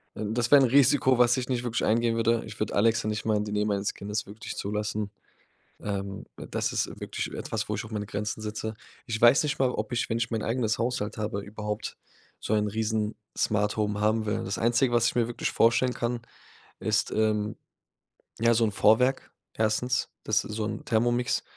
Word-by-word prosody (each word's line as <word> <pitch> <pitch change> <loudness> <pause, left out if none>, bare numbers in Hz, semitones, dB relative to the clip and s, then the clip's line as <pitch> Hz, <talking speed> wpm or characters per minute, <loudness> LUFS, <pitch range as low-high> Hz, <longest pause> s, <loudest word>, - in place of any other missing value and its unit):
das 115 +3 -1
wäre 145 -1 +9
'n - - +6
Risiko, 135 -1 +5
was 120 0 +4
ich 125 0 -3
nicht 125 -2 0
wirklich 120 -1 -1
eingehen 115 +1 +2
würde. 115 0 +2
Ich 110 -1 -10
würde 110 - -2
Alexa 110 +1 +3
nicht 110 0 -2
mal 110 -1 +2
in 105 - -1
die 105 - -5
Nähe 105 0 +1
meines 100 -1 -1
Kindes 105 +1 -4
wirklich 105 +2 -7
zulassen. 105 0 -2 0.7
Ähm, 100 -1 -4
das - - -3
ist - - +1
wirklich - - -4
etwas, - - -3
wo - - -1
ich - - -3
auch 110 - -10
meine 105 -2 -3
Grenzen 105 +2 -3
setze. 110 +1 -4 0.3
Ich 110 -2 -3
weiß 120 +3 +7
nicht 150 -1 -1
mal, 130 - +3
ob 110 -1 -4
ich 120 - 0
wenn 115 - 0
ich 115 0 -1
mein 110 -2 -1
eigenes 115 -2 0
Haushalt 115 -3 -2
habe, 105 -2 -2
überhaupt 105 +1 -5 0.4
so 110 - -1
ein 105 -1 +2
riesen 110 0 -1 0.2
Smart-Home 105 0 0
haben 110 +1 +2
will. 105 - -1
Das 95 +2 -2
Einzige, 120 +2 +2
was 120 -1 +4
ich - - -3
mir 120 -2 +2
wirklich 120 -1 -2
vorstellen 120 +2 +3
kann, 120 0 -2 0.6
ist, 110 0 +1
ähm, 105 -1 +1 0.8
ja, 115 +1 +4
so 115 0 +3
'n 110 - +1
Vorwerk 125 +6 +3 0.2
1., 115 +3 0
das 105 -1 +2
ist - - -7
so 110 - -1
'n 110 0 -5
Thermomix, 120 +2 +1
110 Hz, 200 wpm, -27 LUFS, 105-120 Hz, 0.8 s, wäre